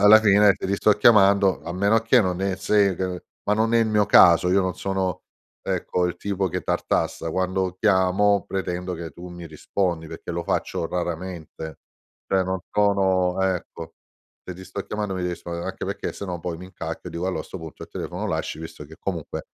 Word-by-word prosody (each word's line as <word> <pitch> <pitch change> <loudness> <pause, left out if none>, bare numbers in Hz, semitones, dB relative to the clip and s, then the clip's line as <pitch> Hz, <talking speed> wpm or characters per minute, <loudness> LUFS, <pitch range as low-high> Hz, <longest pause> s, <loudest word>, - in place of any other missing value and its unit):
alla 110 +1 +9
fine 105 -1 +5
te - - -9
li 100 - +1
sto 105 +1 +4
chiamando, 100 -3 +5
a 85 - -5
meno 100 +4 +3
che 115 +2 +4
non 90 0 -2
è 95 -1 0
se 100 -1 +2
c 90 -1 -3 0.2
ma 105 - +1
non 110 +2 +1
è - - +6
il 115 - +3
mio 105 -1 +2
caso, 90 +1 +7
io 95 +1 +4
non 95 -1 -1
sono, 95 -2 -2 0.4
ecco, 90 0 -1
il 90 0 -3
tipo 95 0 -1
che - - -3
tartassa, 80 - -1
quando 95 0 -1
chiamo 100 0 +3
pretendo 90 -1 -3
che 85 -1 -6
tu 90 +1 -10
mi 85 -1 -9
rispondi, 80 +1 -2
perché - - -8
lo 85 0 -2
faccio 85 - -1
raramente. 85 -3 -5 0.5
Cioè 95 -1 +2
no 95 -1 -3
sono, 95 -3 +2
ecco, 95 -2 -3 0.5
se 90 - -7
ti 95 - -10
sto 95 +2 -6
chiamando 105 -2 -3
mi 90 - -3
de 90 -1 -1
rispondere 85 - -10
anche - - -5
perché - - -4
se 100 - -6
no 90 -3 -5
poi 85 -1 -4
mi 90 - -10
incacchio 95 - -7
e - - -13
dico, 85 +2 -3
allo 95 - -1
a - - -5
sto 95 - -9
punto 80 -2 -10
il - - -9
telefono - - -5
lo - - -3
lasci, - - -3
visto 80 - -8
che - - -13
comunque - - -4
95 Hz, 210 wpm, -24 LUFS, 90-100 Hz, 0.5 s, alla